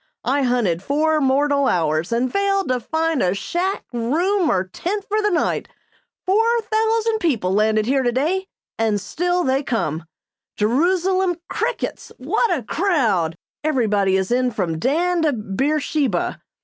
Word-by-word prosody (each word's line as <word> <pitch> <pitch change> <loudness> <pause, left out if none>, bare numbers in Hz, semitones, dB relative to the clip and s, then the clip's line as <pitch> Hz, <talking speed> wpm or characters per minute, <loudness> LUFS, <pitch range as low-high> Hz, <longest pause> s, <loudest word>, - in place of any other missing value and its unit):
I 275 +3 +1
hunted 240 -10 +1
four 305 +6 +1
mortal 280 +1 +2
hours 160 +1 0
and 240 +2 0
failed 395 -2 +1
to 255 -1 +1
find 320 +3 -1
a 180 +1 +1
shack, 355 - -2
room, 325 - +1
or 185 - +2
tent 385 - -4
for 430 +1 0
the 420 - +2
night. 350 - 0 0.6
Four 455 +5 +3
thousand 445 0 +1
people 235 - 0
landed 215 +1 +2
here 270 +3 +2
today, 295 +10 0 0.3
and 220 -2 +1
still 355 - -1
they 265 +1 +1
come. 170 - -2 0.5
Jerusalem 355 - +2
crickets! - - -3
What 470 - 0
a 305 -8 0
crowd! 215 - 0 0.3
Everybody 210 -10 +2
is 190 +2 -2
in 250 +1 +2
from 180 -8 -2
Dan 340 - +1
to 305 -3 +2
Beersheba! 265 - -1
275 Hz, 140 wpm, -21 LUFS, 215-355 Hz, 0.6 s, Four